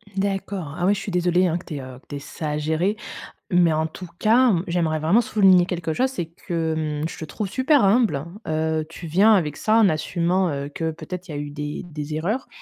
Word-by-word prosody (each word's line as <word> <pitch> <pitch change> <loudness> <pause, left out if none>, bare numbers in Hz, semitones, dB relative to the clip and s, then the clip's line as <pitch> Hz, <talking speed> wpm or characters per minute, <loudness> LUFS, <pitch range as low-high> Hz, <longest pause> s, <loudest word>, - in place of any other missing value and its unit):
D'accord. 195 -5 -2
Ah 175 - 0
oui, 200 - +4
je 205 - -3
suis 200 - -5
désolée 180 +1 +2
hein 170 0 0
que 180 - -11
tu 155 - -6
aies, 140 - -4
heu, 130 -1 -10
que - - -30
tu 145 - -7
aies - - -4
ça 150 +2 -5
à 150 - -1
gérer. 160 +7 0 0.5
Mais 175 -2 +4
en 155 +1 +1
tout 180 +3 -9
cas, 235 +3 +5
mmh, 175 -3 +1
j'aimerais 165 -3 0
vraiment 175 +10 +4
souligner 190 -5 +5
quelque 170 -3 -3
chose, 260 +9 +1
c'est 255 -10 -4
que, 160 -3 -3
mmh, - - 0
je - - -9
te - - -5
trouve 205 +6 -4
super 270 +4 +3
humble. 200 - +2 0.2
Heu, 155 0 0
tu 165 +1 -9
viens 195 +8 +5
avec 150 -6 0
ça, 220 +1 +2
en 220 - +6
assumant, 175 +3 0
heu, 140 -1 -3
que 160 +2 -3
peut-être 180 +3 -8
il - - -5
y - - -5
a - - -4
eu 145 0 -4
des 150 0 -5
des 150 -2 -6
erreurs. 205 +12 -2
170 Hz, 245 wpm, -23 LUFS, 155-195 Hz, 0.5 s, en